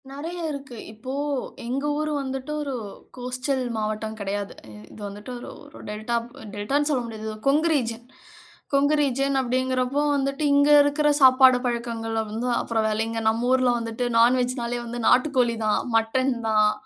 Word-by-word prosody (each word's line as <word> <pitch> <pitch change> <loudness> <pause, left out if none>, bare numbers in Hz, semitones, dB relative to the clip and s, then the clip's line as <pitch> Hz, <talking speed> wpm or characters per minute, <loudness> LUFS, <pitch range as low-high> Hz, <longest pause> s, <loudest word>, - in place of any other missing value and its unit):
நெறைய 320 +6 -6
இருக்கு 275 -4 -8
இப்போ 225 +4 -8 0.5
எங்க 260 +4 -2
ஊர் 305 0 -1
வந்துட்டு 270 +1 -5
ஒரு 280 -2 -3 0.4
கோஸ்டல் 255 +2 -2
மாவட்டம் 215 0 -3
கெடையாது. 200 0 -3 0.4
இது - - -12
வந்துட்டு 205 +4 -9
ஒரு - - -9 0.2
ஒரு 290 - -13
டெல்டா 215 +3 -3 0.4
டெல்டான்னு 275 +9 0
சொல்ல 260 -4 +1
முடியாது. 220 -1 -7 0.2
கொங்கு 305 +4 +3
ரீஜியன் 235 -4 -2 0.7
கொங்கு 285 +2 +3
ரீஜியன் 275 0 +1
அப்படிங்கிறப்போ 255 +2 0
வந்துட்டு, 275 +1 -1
இங்க 285 +1 +4
இருக்கிற 290 +1 +1
சாப்பாடு 260 -1 +7
பழக்கங்கல 230 -2 -2
வந்து 225 +4 -3
அப்புறம் 225 -1 -1
வேலைங்கே 225 +1 -1
நம்ம 230 +2 -1
ஊர்ல 255 -1 +4
வந்துட்டு 230 +1 -4
நான்வெஜ்னாலே 245 0 +2
வந்து 240 +1 -5
நாட்டுக்கோழி 250 -3 +3
தான், 210 - +2
மட்டன் 240 +4 +2 0.2
தான். 215 -1 +4
250 Hz, 140 wpm, -24 LUFS, 225-275 Hz, 0.7 s, சாப்பாடு